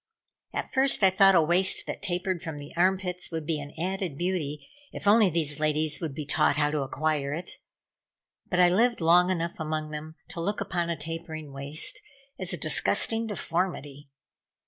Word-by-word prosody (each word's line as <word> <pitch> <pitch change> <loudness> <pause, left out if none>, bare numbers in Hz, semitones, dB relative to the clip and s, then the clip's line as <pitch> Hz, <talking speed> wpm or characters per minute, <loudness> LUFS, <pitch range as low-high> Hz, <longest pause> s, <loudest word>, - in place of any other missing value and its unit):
At - - -4
first 270 -4 +3
I 190 - +7
thought 195 0 +6
a 170 - +6
waist 180 +4 +3
that - - -6
tapered 180 -2 -1
from 160 -2 -6
the 145 0 -10
arm 185 +2 +3
pits 180 -1 -5
would 160 -2 -4
be 155 -1 -1
an 145 0 -8
added 180 -3 -3
beauty, 155 -5 -2 0.2
if - - -6
only 210 -1 +6
these 155 -3 -1
ladies 155 -1 0
would 155 -5 -4
be 150 - -5
taught 150 0 +2
how 150 0 +2
to 150 -1 -1
acquire 140 +1 -1
it. 175 +2 -4 1.0
But 180 - 0
I 180 - +7
lived 235 +6 +2
long 175 +2 +5
enough 170 -2 -2
among 155 -1 -3
them 155 +1 -7
to 170 - -5
look 205 +5 -1
upon 180 -4 -2
a 170 - -1
tapering 160 -1 -6
waist 140 +3 -3 0.4
as - - 0
a - - -2
disgusting 225 0 +2
deformity. 165 -8 -3
165 Hz, 185 wpm, -27 LUFS, 150-185 Hz, 1.0 s, I